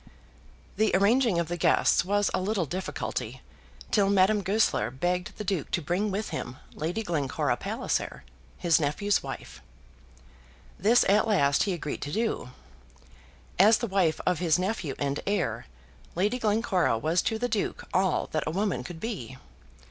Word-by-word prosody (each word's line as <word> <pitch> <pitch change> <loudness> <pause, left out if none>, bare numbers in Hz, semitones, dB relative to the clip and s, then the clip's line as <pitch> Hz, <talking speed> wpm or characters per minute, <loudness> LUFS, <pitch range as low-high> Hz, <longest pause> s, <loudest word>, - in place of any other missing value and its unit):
The 215 +1 +3
arranging 215 +1 +3
of 170 -1 0
the 175 +1 -3
guests - - +4
was 205 +2 +1
a - - 0
little 195 -2 0
difficulty, 185 +6 -4 0.5
till 200 -2 +3
Madame 200 +1 +4
Goesler 195 - +1
begged 175 +8 -2
the 210 - -4
Duke 185 -6 -2
to - - 0
bring 175 +7 -1
with 205 +2 -3
him 120 +2 -5 0.2
Lady 175 +8 -3
Glencora 150 -8 -1
Palliser, - - -3 0.3
his 170 -2 +3
nephew's 190 +8 +1
wife. - - -8 1.2
This 225 +6 +4
at 210 +3 +4
last 145 -9 +3
he 195 - 0
agreed 150 -4 -5
to 145 - -4
do. 220 - -1 1.1
As 215 +4 +7
the - - -2
wife 190 -6 +1
of 180 -3 +1
his 170 -2 +3
nephew 185 -7 -2
and 140 0 -1
heir, 160 - -1 0.5
Lady 205 +8 0
Glencora 210 - +1
was 160 +8 +1
to 220 - -1
the 245 +2 -1
Duke 215 -4 -2
all 185 -2 +2
that 155 -1 -1
a - - 0
woman 185 - -1
could 160 +5 -8
be. 160 - -5
185 Hz, 155 wpm, -27 LUFS, 160-210 Hz, 1.2 s, As